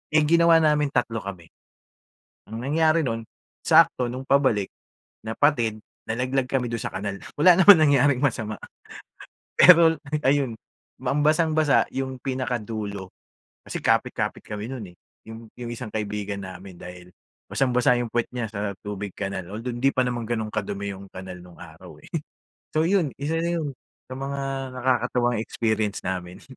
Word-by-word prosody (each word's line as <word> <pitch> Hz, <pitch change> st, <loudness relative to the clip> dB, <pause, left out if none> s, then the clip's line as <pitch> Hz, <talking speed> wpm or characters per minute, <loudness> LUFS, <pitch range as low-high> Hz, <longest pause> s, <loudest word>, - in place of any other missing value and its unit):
Eh, 155 Hz, -, +6 dB
ginawa 170 Hz, +1 st, +5 dB
namin, 150 Hz, -1 st, +3 dB
3 115 Hz, -2 st, 0 dB
kami 95 Hz, -4 st, -7 dB, 1.1 s
ang 110 Hz, -, -5 dB
nangyari 155 Hz, +4 st, +2 dB
nun 115 Hz, -1 st, -2 dB, 0.4 s
sakto 160 Hz, -6 st, +4 dB
nung 130 Hz, +1 st, -7 dB
pabalik, 130 Hz, -8 st, +3 dB, 0.6 s
napatid, 115 Hz, -1 st, +1 dB, 0.3 s
nalaglag 125 Hz, +3 st, -1 dB
kami 130 Hz, -2 st, 0 dB
dun 115 Hz, -1 st, -3 dB
sa -, -, -3 dB
kanal, 100 Hz, -1 st, -3 dB, 0.2 s
wala 170 Hz, +3 st, +7 dB
naman 190 Hz, +1 st, +9 dB
nangyaring 145 Hz, -3 st, +4 dB
masama. 110 Hz, -7 st, -1 dB, 1.0 s
Pero 165 Hz, -2 st, +7 dB, 0.3 s
ayun, 135 Hz, -3 st, +2 dB, 0.4 s
ang 145 Hz, -, 0 dB
basang-basa 155 Hz, -1 st, +3 dB
yung 130 Hz, -1 st, -3 dB
pinakadulo 110 Hz, -7 st, -4 dB, 0.5 s
kasi -, -, -5 dB
kapit -, -, +2 dB
kapit -, -, -2 dB
kami 105 Hz, 0 st, -6 dB
nun, 125 Hz, -5 st, -6 dB
eh, 90 Hz, -, -24 dB, 0.3 s
yung 115 Hz, +1 st, -9 dB
yung 120 Hz, -1 st, -7 dB
isang 110 Hz, -2 st, -7 dB
kaibigan 105 Hz, -1 st, -3 dB
namin 95 Hz, +1 st, -9 dB
dahil 90 Hz, 0 st, -11 dB, 0.4 s
basang-basa 125 Hz, -2 st, +3 dB
yung 120 Hz, -, -4 dB
pwet 120 Hz, -1 st, 0 dB
niya 120 Hz, -3 st, -2 dB
sa 100 Hz, -1 st, -3 dB
tubig 105 Hz, -1 st, -5 dB
kanal 95 Hz, -2 st, -5 dB
although 115 Hz, +3 st, -4 dB
hindi 135 Hz, +3 st, +2 dB
pa 130 Hz, -, +3 dB
naman 120 Hz, -2 st, -2 dB
ganun 110 Hz, -2 st, -2 dB
kadumi 100 Hz, -1 st, -3 dB
yung 95 Hz, +1 st, -11 dB
kanal 95 Hz, -1 st, -8 dB
nung 90 Hz, -1 st, -15 dB
araw, -, -, -13 dB
eh. -, -, -15 dB, 0.7 s
So, 155 Hz, -, +3 dB
yun 180 Hz, -8 st, +2 dB
isa 155 Hz, +3 st, -1 dB
na 170 Hz, +1 st, -1 dB
yun 145 Hz, -, -3 dB, 0.4 s
sa -, -, -5 dB
mga 140 Hz, +1 st, -4 dB, 0.3 s
nakakatawang 125 Hz, -1 st, +1 dB
experience 110 Hz, -2 st, -1 dB
namin. 90 Hz, -1 st, -5 dB
120 Hz, 150 wpm, -24 LUFS, 105-145 Hz, 1.1 s, naman